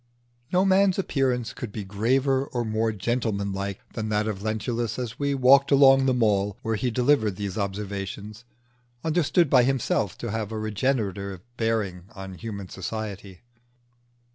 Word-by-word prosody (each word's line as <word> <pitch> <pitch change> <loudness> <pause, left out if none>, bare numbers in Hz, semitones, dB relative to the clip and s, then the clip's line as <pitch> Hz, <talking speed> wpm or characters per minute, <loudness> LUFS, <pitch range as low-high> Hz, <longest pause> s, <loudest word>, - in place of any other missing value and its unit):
No 185 +1 +3
man's 190 -1 +4
appearance 130 - 0
could 120 - -6
be 105 0 -5
graver 130 +7 +1
or 120 -2 -2
more 110 +1 0
gentleman 105 -2 -1
like 100 0 -5
than 110 -1 -3
that 105 0 +1
of 100 -3 -3
Lentulus 110 +1 -2
as 120 -3 -5
we 140 -1 0
walked 135 +1 +5
along 135 -1 +6
the 130 - +3
Mall 105 -4 +1
while 115 - -1
he 125 +4 0
delivered 120 -4 +2
these 100 -1 -4
observations, 100 +2 -4 0.6
understood 165 0 +2
by 130 -2 +5
himself 125 -6 0
to 120 - -4
have 110 -1 -3
a 110 - -3
regenerative 105 -4 -2
bearing 110 -6 -1
on 95 -1 -7
human 100 -1 -6
society. 100 -1 -6
110 Hz, 150 wpm, -25 LUFS, 100-130 Hz, 0.6 s, along